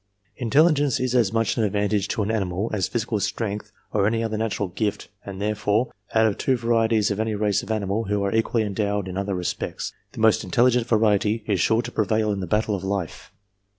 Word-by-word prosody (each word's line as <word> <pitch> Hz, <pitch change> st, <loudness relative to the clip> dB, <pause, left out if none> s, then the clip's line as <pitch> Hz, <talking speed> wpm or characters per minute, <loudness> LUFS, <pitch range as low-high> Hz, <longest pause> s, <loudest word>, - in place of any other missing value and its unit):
Intelligence 145 Hz, +2 st, +3 dB
is 130 Hz, -1 st, -1 dB
as 120 Hz, -6 st, +3 dB
much 115 Hz, +1 st, 0 dB
an 115 Hz, -, +2 dB
advantage 105 Hz, 0 st, 0 dB
to 110 Hz, -, -1 dB
an 105 Hz, -, -1 dB
animal 100 Hz, -1 st, -1 dB
as 95 Hz, -4 st, 0 dB
physical 115 Hz, -2 st, -2 dB
strength 105 Hz, 0 st, -3 dB, 0.2 s
or 100 Hz, -1 st, +2 dB
any 115 Hz, +1 st, 0 dB
other 110 Hz, -1 st, -2 dB
natural 105 Hz, -3 st, -2 dB
gift, 105 Hz, +3 st, -3 dB
and 95 Hz, -1 st, -7 dB
there 105 Hz, +1 st, 0 dB
fore, 105 Hz, +3 st, 0 dB, 0.2 s
out 110 Hz, 0 st, +5 dB
of 105 Hz, -2 st, 0 dB
two 130 Hz, -2 st, +1 dB
varieties 115 Hz, -2 st, +2 dB
of 100 Hz, -, -2 dB
any 110 Hz, -1 st, 0 dB
race 105 Hz, -1 st, +1 dB
of -, -, -11 dB
animal 110 Hz, 0 st, -1 dB
who 105 Hz, 0 st, 0 dB
are 100 Hz, -, -1 dB
equally 115 Hz, 0 st, +1 dB
endowed 100 Hz, -1 st, -1 dB
in 90 Hz, -, -6 dB
other 100 Hz, 0 st, -2 dB
respects, 90 Hz, -1 st, -4 dB, 0.2 s
the -, -, -9 dB
most 110 Hz, 0 st, +4 dB
intelligent 120 Hz, +5 st, +2 dB
variety 110 Hz, -1 st, +2 dB
is 100 Hz, -4 st, 0 dB
sure 115 Hz, +2 st, +2 dB
to -, -, -6 dB
prevail 110 Hz, 0 st, +1 dB
in 100 Hz, -, -2 dB
the 95 Hz, -, -4 dB
battle 105 Hz, +3 st, +1 dB
of 95 Hz, -2 st, -3 dB
life. 95 Hz, -4 st, -4 dB
105 Hz, 215 wpm, -24 LUFS, 100-115 Hz, 0.2 s, out